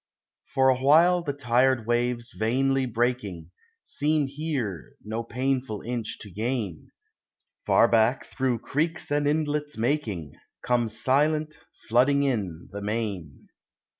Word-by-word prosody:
For 130 -1 +5
while 170 +5 +5
the 155 -4 -2
tired 130 -3 +2
waves, 120 0 0
vainly 130 +4 +1
breaking, 110 -8 -2 0.3
Seem 150 0 0
here 135 - -4
no 110 +2 -3
painful 125 -2 -2
inch 120 -1 -4
to 105 - -9
gain, 110 -4 -3 0.8
Far - - +5
back, 115 +2 +2
through 130 -4 -1
creeks 160 +2 -2
and 145 0 +1
inlets 150 -1 -1
making, 110 - -1 0.3
Comes 115 -2 0
silent, 150 +4 +1 0.3
flooding 135 +5 +3
in, 100 - -2
the 100 - -6
main. 100 -8 -4
125 Hz, 115 wpm, -26 LUFS, 110-140 Hz, 0.8 s, For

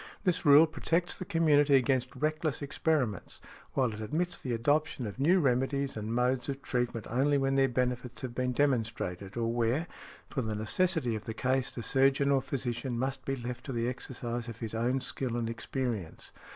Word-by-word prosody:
This 180 -4 +1
rule 145 +3 +9
protects 165 +3 -1
the 185 - -6
community 150 -4 +4
against 130 -1 +1
reckless 155 +1 -1
experiments, 140 -6 -1 0.3
while 125 -4 +1
it 105 - -7
admits 165 +11 -1
the 125 - -4
adoption 145 +3 +1
of 105 +4 -6
new 175 +7 +4
remedies 135 0 +1
and 110 0 -4
modes 125 +2 +1
of 140 0 -4
treatment 120 -3 -2
only 140 +5 +2
when 135 0 +1
their 135 0 +3
benefits 125 0 -2
have 125 -2 -4
been 125 0 -1
demonstrated, 115 -8 -1
or 115 0 0
where, 120 +7 +1 0.4
from 130 -5 -3
the 110 - -2
necessity 155 - +1
of 110 - -6
the 115 - -5
case, 130 +2 0
the 120 - -6
surgeon 135 +2 +3
or 135 -1 +3
physician 120 -1 -3
must 130 +2 -2
be 135 - -1
left 120 -1 -6
to - - -4
the 120 -1 -1
exercise 120 -1 -4
of 115 -2 -7
his 115 -1 -5
own 120 +4 0
skill 125 -2 0
and 115 -1 -2
experience. 115 -6 -4
130 Hz, 185 wpm, -30 LUFS, 120-140 Hz, 0.4 s, rule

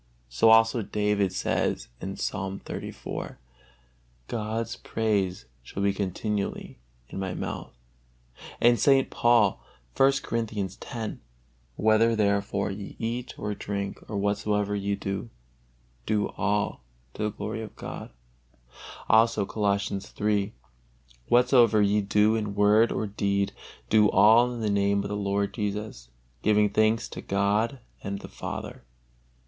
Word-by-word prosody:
So 65 - +4
also 115 +1 +5
David 105 -2 0
says - - -1
in 95 +1 -5
Psalm 95 -1 -3
xxxiv: - - -6 0.9
"God's 115 +1 -3
praise 100 - -1 0.2
shall 95 +11 -5
be 100 0 +2
continually 100 - -3 0.3
in - - -6
my 95 -2 -3
mouth." - - -6 0.8
And 120 -1 +5
St. 135 +3 +4
Paul, 120 -4 +3 0.4
I. 135 +1 +7
Corinthians 110 -5 -2
x: 115 -5 -4 0.6
"Whether 110 +1 +3
therefore 100 -1 0
ye 100 0 -7
eat 120 +2 -4
or 105 0 -3
drink, 100 -1 -4
or 105 - -3
whatsoever 105 0 0
ye 100 0 -1
do, 100 +3 -4 0.8
do 105 -1 +1
all 105 -6 -1 0.3
to - - -7
the - - +1
glory 105 +2 -5
of 110 - -9
God." - - -7 1.0
Also 110 -2 +4
Colossians 100 -1 -1
iii: 105 +1 0 0.7
"Whatsoever 120 -3 +5
ye 105 0 +3
do 105 +2 +3
in 105 -2 -2
word 105 +3 +4
or - - -1
deed, 100 -1 0 0.4
do 105 -2 +6
all 115 +3 +6
in 120 -2 -5
the 105 -2 0
Name 100 0 +2
of 100 - -5
the 105 - -2
Lord 100 0 -1
Jesus, 105 - -4 0.3
giving 105 +2 +3
thanks 110 +2 +2
to - - -7
God 105 +6 0 0.3
and 100 0 -4
the - - -8
Father." - - -7
105 Hz, 130 wpm, -27 LUFS, 100-110 Hz, 1.0 s, I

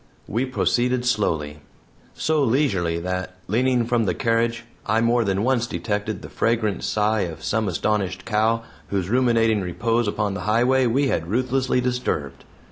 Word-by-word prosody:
We 120 +5 -1
proceeded 125 +2 +1
slowly; 80 -11 0 0.6
so 155 -2 +1
leisurely 110 - +1
that, 90 +1 -3
leaning 125 +3 +2
from 120 -1 +1
the 95 - 0
carriage, 115 0 0 0.2
I 110 +2 +1
more 115 +1 +3
than 100 -1 0
once 120 -1 +1
detected 105 -1 -3
the - - -7
fragrant 115 -3 0
sigh 105 0 +1
of 80 - -10
some 110 -1 0
astonished 95 0 -1
cow, 115 +1 +1 0.2
whose 95 -2 -2
ruminating 115 -4 +3
repose 115 +6 0
upon 105 -1 -1
the 95 - -4
highway 125 +3 +3
we 135 +4 +2
had 80 -6 -1
ruthlessly 130 +3 +1
disturbed. 125 - -2
115 Hz, 150 wpm, -23 LUFS, 100-125 Hz, 0.6 s, more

